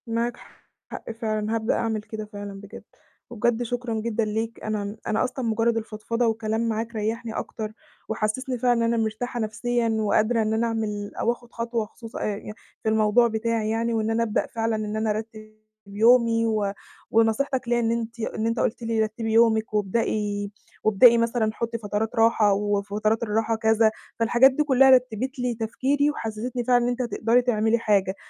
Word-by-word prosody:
معاك 235 +1 -1 0.5
حق - - -6
فعلًا، 220 -1 -2
هابدأ 225 0 0
أعمل 220 -2 -1
كده 215 0 -7
فعلًا 205 -1 -8
بجد. 200 - -11 0.5
وبجد 240 0 0
شكرًا 245 0 -3
جدًا 225 0 -1
ليك، 220 +2 -3
أنا 210 -1 -3
أنا 215 - +1
أصلًا 255 0 -3
مجرد 230 +1 +1
الفضفضة 225 +2 -2
والكلام 225 +1 -1
معاك 225 +1 -3
ريحني 225 +2 -3
أكتر، 215 -1 -5 0.4
وحسسني 220 +4 -2
فعلًا 245 +1 +3
إن 230 - +1
أنا 230 -1 +1
مرتاحة 240 +3 -3
نفسيًا 230 +2 -1
وقادرة 220 +1 +2
إن 215 0 0
أنا 230 +1 +1
أعمل 210 -3 -3
أو 235 - +2
آخد 240 0 -9
خطوة 230 -1 -2
خصوصً 225 +2 -10
أ - - -3
يعني 210 0 -4 0.3
في 220 - +1
الموضوع 220 +2 +4
بتاعي 225 -1 -1
يعني، 230 +1 0
وإن 220 -1 0
أنا 230 +1 +1
أبدأ 220 -2 -1
فعلًاً 225 -1 -1
إن 215 0 -3
أنا 220 0 0
أرتب 215 0 -7 0.3
يومي 230 +2 +4
و 215 -3 0 0.4
ونصيحتك 235 +4 +1
ليَّ 240 0 +2
إن 230 -1 +1
أنتِ 230 0 -3
إن 220 0 -2
أنت 230 +1 -1
قلت 230 - -1
لي 230 -1 -1
رتِّبي 220 +1 -3
يومِك 220 -1 +3
وابدئي 205 0 -1 0.3
وابدئي 230 +3 +6
مثلًا 230 -1 +1
حُطِّي 230 +1 -3
فترات 215 +1 -3
راحة، 225 -2 +4
وفترات 205 +2 0
الراحة 225 +1 0
كذا. 220 0 +3 0.3
فالحاجات 240 +4 +5
دي 300 +3 +1
كلها 270 -2 +5
رتبت 255 0 +2
لي 245 -1 -1
تفكيري 265 +6 0
وحسستني 235 0 -4
فعلًاً 245 0 +3
إن 240 - +1
أنتِ 245 +1 -2
هتقدري 235 0 +2
تعملي 225 -2 +2
حاجة، 200 -4 +1
225 Hz, 175 wpm, -25 LUFS, 215-235 Hz, 0.5 s, وابدئي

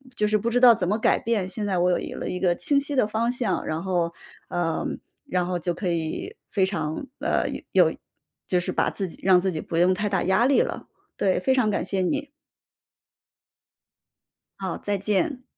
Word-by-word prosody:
就 210 - +1
是 215 0 +3
不 230 +3 -1
知 245 - +3
道 245 -2 +8
怎 180 -4 -2
么 210 +3 +1
改 - - +3
变， 220 -5 -1
现 205 +2 -3
在 190 -3 0
我 180 0 +2
有 - - -6
了 - - -4
一 180 - -3
个 180 -2 +3
清 285 +8 +1
晰 285 0 -3
的 235 -5 +3
方 230 +3 0
向。 235 -8 -1
然 155 +1 -2
后 175 -3 0 0.4
呃， 165 -2 -1 0.4
然 180 -1 -1
后 180 -1 -1
就 175 +1 -2
可 190 - -4
以 170 - -3 0.2
非 190 -2 +3
常， 190 - -3
呃， - - 0 0.3
有 - - +4 0.5
就 180 - +2
是 175 - -2
把 - - +1
自 195 -2 -3
己 - - -12
让 185 -1 +5
自 190 0 0
己 155 - -3
不 - - -6
用 175 +2 +5
太 210 +3 -1
大 195 -3 +1
压 190 +6 +3
力 275 0 +4
了， - - -3 0.3
对， 190 -2 +2
非 265 +8 +2
常 225 -5 +2
感 - - -1
谢 195 -1 -1
你。 285 +10 -1 2.3
好， 190 -3 -3
再 205 -1 -1
见。 245 - 0
195 Hz, 220 characters per minute, -25 LUFS, 180-230 Hz, 2.3 s, 道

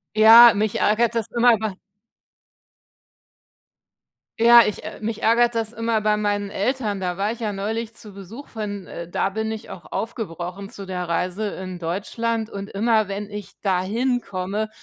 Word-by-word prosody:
Ja, 225 +2 +9
mich 210 0 -1
ärgert 230 +2 +2
das 225 -1 -1
immer 235 -1 +4
bei 215 -2 -3 2.7
Ja, 235 +1 +8
ich 210 - -3
ä - - -8
mich 220 0 -4
ärgert 235 +1 +3
das 225 0 -2
immer 230 -1 0
bei 210 0 +2
meinen 205 -1 -1
Eltern. 210 -1 -2
Da 180 -1 -3
war 205 +2 0
ich 235 - -7
ja 215 -2 -1
neulich 220 +3 -4
zu 215 -3 -13
Besuch 200 +8 -10
von, 205 -3 -6
äh, 170 0 -7
da 195 - 0
bin 220 +2 -3
ich 220 +1 -7
auch 180 - -11
aufgebrochen 195 -3 -5
zu 200 -2 -9
der 180 -2 -4
Reise 185 +5 -2
in 185 -1 -7
Deutschland. 220 +6 -3
Und 200 0 -7
immer, 215 0 +1
wenn 200 +1 -5
ich 205 -1 -9
da 185 -3 +1
hin 245 +5 0
komme, 195 +3 -3
210 Hz, 170 wpm, -22 LUFS, 195-230 Hz, 2.7 s, Ja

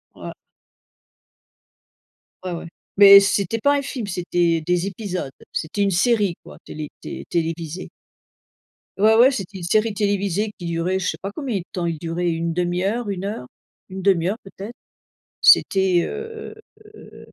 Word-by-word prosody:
Ouais. - - -8 2.1
Ouais, 185 - -4
ouais, 170 -1 -6 0.3
mais 200 -1 +10
c'était 200 +2 0
pas 285 +4 +3
un - - -1
film, 260 -4 -5
c'était 175 -2 0
des 175 +3 0
épisodes, 185 -7 -5 0.2
c'était 165 +6 -3
une 200 -1 +2
série, 200 -1 +2
quoi, - - -13
télé 150 -1 -7
té - - -7
télévisée. 165 +1 -3 1.1
Ouais, 215 +2 +5
ouais. 245 +4 +6
C'était 195 -6 -5
une 180 - -8
série 215 +5 +1
télévisée 200 0 0
qui 175 - -6
durait 170 +3 -1
je 180 - -2
sais - - -4
pas 195 - -5
combien 250 -2 -3
de 180 - -5
temps, 175 -2 -3
il 165 -2 -2
durait 170 +2 -2
1/2 175 +2 -1
heure, 215 +2 -1
1 190 -1 -4
heure, 200 -12 -5 0.4
1/2 190 -2 +1
heure 215 - -2
peut-être, 200 +4 -10 0.7
c'était, 190 -2 +5
heu 440 0 -7 0.4
heu, - - -14
190 Hz, 150 wpm, -22 LUFS, 170-210 Hz, 2.1 s, mais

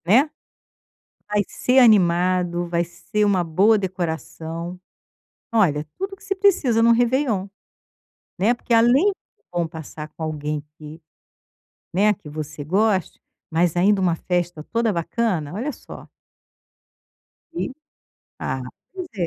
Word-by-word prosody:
Né, 250 - +5 1.0
vai 210 0 +2
ser 255 +1 +1
animado, 180 -5 +3
vai 170 0 +1
ser 190 +5 -2
uma 195 -3 +2
boa 190 +7 +4
decoração, 170 -2 -4 0.7
olha, 155 -10 +2
tudo 390 +1 -4
que 390 - -22
se 390 - -1
precisa 375 - +3
em 230 - +5
um - - +6
réveillon, 235 -4 +2 0.9
né, 210 +6 +3
porque 240 0 -1
além 250 - +5 0.4
bom 175 -1 0
passar 160 -1 -8
com 160 - -7
alguém 150 -1 -3 0.2
que, 155 +1 -11 0.9
né, 210 +4 +3
que 175 - -23
você 150 0 -6
goste, 190 +2 +1 0.3
mas 170 +1 +1
ainda 195 +3 +4
uma 175 -3 +2
festa 175 -2 -2
toda 230 -1 +2
bacana, 170 -3 -1
olha 245 +9 -2
só. - - -12 1.5
E, 340 - -2 0.8
ah 130 0 -3 0.3
pois 370 -2 -6
é. 180 -4 -1
185 Hz, 130 wpm, -22 LUFS, 165-230 Hz, 1.5 s, um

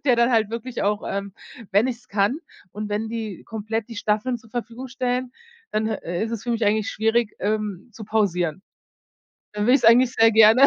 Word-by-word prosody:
der 255 -4 +4
dann 235 +1 +4
halt 220 -2 +2
wirklich 235 +2 -4
auch, 205 +1 0
ähm 200 0 -3 0.4
wenn 205 +5 +4
ich 255 -2 -2
es 235 - -25
kann 205 +8 +1 0.3
und 210 0 -5
wenn 210 +2 -2
die 220 -4 -5
komplett 220 0 -4
die 230 - -8
Staffeln 215 +4 0
zur 225 -1 -20
Verfügung 240 +2 -5
stellen, 250 0 -2 0.4
dann, 215 +1 0
äh, 180 -3 -2
ist 225 - -5
es 230 - -4
für 240 - -3
mich 230 -1 0
eigentlich 210 +1 +1
schwierig, 225 0 +1
ähm, 210 -1 -2
zu 220 - -9
pausieren. 185 -6 0 0.9
Dann 210 0 -1
würd 250 - +6
ich's - - -5
eigentlich 245 +2 +6
sehr 225 -2 +5
gerne 220 +5 +8
220 Hz, 205 wpm, -23 LUFS, 210-235 Hz, 0.9 s, gerne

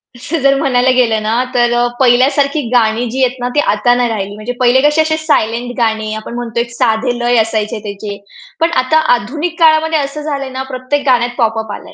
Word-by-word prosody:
असं 295 +7 -4
जर 275 +1 +4
म्हणायला 260 -3 +1
गेलं 225 -4 +2
ना, 230 +3 0
तर 240 -1 +2
अ, 240 0 +2
पहिल्यासारखी 275 +4 +3
गाणी 230 0 +2
जी 260 +2 0
आहेत 255 +1 -4
ना 245 - -2
ती 295 - +3
आता 245 +4 +2
नाही 245 -1 +1
राहिली 205 -2 -4
म्हणजे 215 +4 -5
पहिले 250 +1 +4
कसे 300 +2 +3
असे 315 0 0
सायलेंट 245 -6 -1
गाणी 220 -2 -1
आपण 220 +2 -7
म्हणतो 235 -1 -4
एक 235 - -2
साधे 240 0 0
लय 240 0 +1
असायचे 220 0 -2
त्याचे, 200 0 -6 0.4
पण 330 +1 +1
आता 285 +5 +2 0.2
आधुनिक 300 +10 -4
काळामध्ये 320 0 +3
असं 280 +1 -4
झालंय 280 -3 -4
ना 260 0 -5
प्रत्येक 265 +3 -2
गाण्यात 245 -2 +2
पॉप 225 -2 +1
अप 220 -1 -6
आलंय. - - -10
245 Hz, 205 wpm, -14 LUFS, 225-275 Hz, 0.4 s, जर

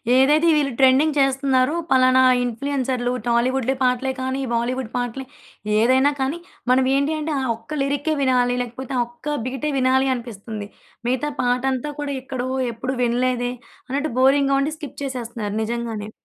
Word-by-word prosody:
ఏదైతే 300 +5 +4
వీళ్ళు 285 -3 +1
ట్రెండింగ్ 275 +3 +4
చేస్తున్నారో 270 +1 +2
ఫలానా 260 0 +5 0.2
ఇన్‌ఫ్లూ‌ఎన్‌సర్‌లు 250 0 -1 0.2
టాలీవుడ్‌లో 255 +2 +1
పాటలే 255 +1 +1
కానీ, 260 +1 -2
బాలీవుడ్ 240 0 -1
పాటలు 245 +2 -3 0.5
ఏదైనా 260 +5 +4
కానీ, 285 +6 -1 0.3
మనం 255 0 +4
ఏంటి 280 +3 +1
అంటే 310 +1 -3
ఆ - - -2
ఒక్క 260 +7 -7
లిరిక్కే 285 +3 0
వినాలి 250 -2 +2
లేకపోతే, 245 +2 -6
ఆ - - +4
ఒక్క 295 +5 -5
బీటే 270 +3 -2
వినాలి 260 +1 +3
అనిపిస్తుంది. 220 -3 -7 0.4
మిగతా 260 +4 0
పాటంతా 255 +3 0
కూడా 285 -1 -3
ఎక్కడో, 255 -1 -4 0.3
ఎప్పుడూ 255 +3 -4
వినలేదే 245 0 0 0.4
అన్నట్టు 285 +1 -1
బోరింగ్‌గా 275 +1 +4
ఉండి 300 +2 -1
స్కిప్ 290 -2 -9
చేసేస్తున్నారు 235 -5 -4
నిజంగానే. 225 -2 -4
260 Hz, 140 wpm, -22 LUFS, 245-275 Hz, 0.5 s, ఫలానా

